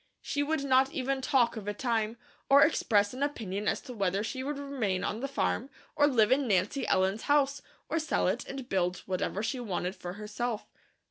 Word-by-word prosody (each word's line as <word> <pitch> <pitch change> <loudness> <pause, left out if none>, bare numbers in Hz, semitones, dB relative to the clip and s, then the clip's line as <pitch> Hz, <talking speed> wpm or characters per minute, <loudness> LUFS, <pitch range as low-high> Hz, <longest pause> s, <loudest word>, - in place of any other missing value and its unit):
She 285 - -1
would 300 0 0
not 265 0 +4
even 265 0 -1
talk 260 -4 +2
of 210 -3 -7
a 205 - -2
time, 225 -2 -1 0.3
or 280 +1 +8
express 210 -9 +2
an 255 - -7
opinion 210 -8 -2
as - - +1
to 250 - -9
whether 195 -2 0
she 260 +3 -4
would 290 +1 -3
remain 250 -10 -2
on 215 - -2
the 275 - -2
farm, 275 -1 -1 0.3
or 290 -1 +5
live 225 -6 +3
in 270 0 +3
Nancy 205 +7 +1
Ellen's 190 +3 +2
house, 285 -1 +3 0.3
or 325 - 0
sell 315 - 0
it 205 +7 0
and 270 -2 -6
build 180 -4 0
whatever 190 +2 -2
she 250 +3 -2
wanted 190 -4 -3
for 175 0 -6
herself. 210 +2 -4
240 Hz, 200 wpm, -30 LUFS, 205-275 Hz, 0.3 s, or